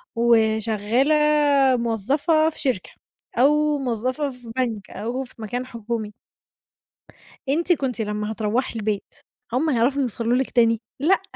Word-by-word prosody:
وشغالة 225 +3 +2 0.6
موظّفة 275 - +1
في - - -11
شركة، 255 -9 -1 0.5
أو 300 +3 +3
موظفة 255 +3 -2
في 245 -2 -12
بنك، 225 -6 -2
أو 245 +5 -3
في 255 - -15
مكان 245 +4 -3
حكومي 230 -3 -5 1.4
أنتِ 335 +5 +2
كنتِ 260 -7 -2
لمّا 210 0 -3
هتروّحي 220 +4 -1
البيت، 210 -1 -3 0.4
هُم 310 +6 +1
هيعرفوا 265 +2 +2
يوصلوا 235 -1 0
لِك 265 0 0
تاني؟ 230 -1 +3 0.2
لأ، 360 +7 +3
240 Hz, 120 wpm, -23 LUFS, 220-275 Hz, 1.4 s, أو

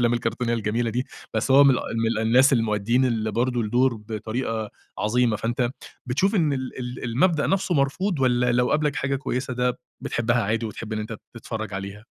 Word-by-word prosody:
والأفلام 120 0 +3
الكرتونية 120 0 -1
الجميلة 115 +1 -1
دي 125 +3 -2 0.3
بس 110 +4 0
هو 140 +2 +8
من 140 - +7
الأ 125 - +1 0.4
من - - 0
الناس 125 +5 +5
المؤديين 115 +1 +2
اللي 110 -3 0
برضه 120 +3 0
الدور 120 +3 +2
بطريقة 110 0 -4 0.3
عظيمة 115 +1 +2
فأنت 120 +3 -1
م 120 - +1 0.4
بتشوف 185 - +1
إن 160 -7 +2
ال 130 -1 -4
ال 125 0 -5
المبدأ 145 +7 +2
نفسه 190 -2 +1
مرفوض 145 +4 0
والّا 125 -1 +2
لو 125 +1 +2
قابلك 150 -1 +1
حاجة 140 0 0
كويسة 130 -1 -3
ده 125 0 0 0.2
بتحبها 120 0 0
عادي 110 +3 -1
وتحب 110 +1 -7
إن 110 - -2
أنت 110 +1 -5 0.2
تتفرّج 110 -3 -5
عليها؟ 100 +2 -6
120 Hz, 190 wpm, -24 LUFS, 110-130 Hz, 0.4 s, هو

